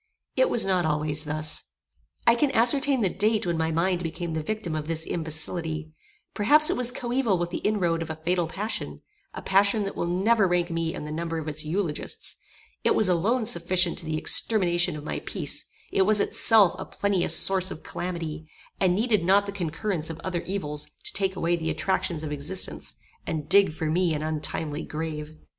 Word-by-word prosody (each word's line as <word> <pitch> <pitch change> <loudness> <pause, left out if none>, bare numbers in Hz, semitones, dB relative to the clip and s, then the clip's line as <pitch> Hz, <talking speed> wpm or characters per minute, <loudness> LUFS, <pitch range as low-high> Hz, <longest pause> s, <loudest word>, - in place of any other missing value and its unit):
It - - +3
was 235 - +3
not 185 -2 +1
always 150 0 -1
thus. 155 +1 0 0.6
I 235 - +6
can 275 +5 +2
ascertain 260 +3 +4
the 200 - +3
date 210 +3 +1
when 170 -1 0
my 160 0 0
mind 175 +2 0
became 165 0 -4
the 160 - -2
victim 195 0 -4
of 155 -1 -4
this 160 0 0
imbecility; 160 0 -3 0.4
perhaps 295 +9 +5
it - - 0
was 245 0 +3
coeval 245 -4 0
with 175 0 -3
the - - -3
inroad 175 -6 0
of 165 - -5
a 160 - -4
fatal 170 +2 -1
passion; 205 +7 -5 0.3
a - - -7
passion 200 +2 +3
that 195 - -4
will 170 - -2
never 195 +4 +2
rank 175 -1 0
me 165 -1 -2
in - - -6
the 150 - -6
number 165 +1 -3
of 160 -1 -5
its 155 0 -2
eulogists; 160 -1 -1 0.5
it - - +3
was 215 - +3
alone 210 +7 +1
sufficient 175 -1 +3
to - - -7
the 155 0 -2
extermination 180 -2 +2
of 150 - -8
my - - -4
peace: - - -3 0.3
it - - +2
was 210 +2 +4
itself 210 -3 +5
a 190 - -5
plenteous 200 -3 0
source 190 -1 +2
of 160 - -8
calamity, 160 -3 -5 0.3
and 180 -2 +3
needed 215 -3 +1
not 195 +3 +4
the 200 - -4
concurrence 175 -2 -3
of 165 0 -7
other 180 -2 -2
evils 150 -6 -3 0.2
to - - -1
take 190 -1 0
away 170 0 +1
the 160 -1 -3
attractions 170 -4 -1
of 150 - -4
existence, 150 +6 -1 0.3
and 155 -3 -3
dig 200 +1 +5
for 160 +1 -5
me 165 +1 +1
an 150 - -3
untimely 155 -1 -2
grave. 155 -1 -6
175 Hz, 195 wpm, -26 LUFS, 160-200 Hz, 0.6 s, I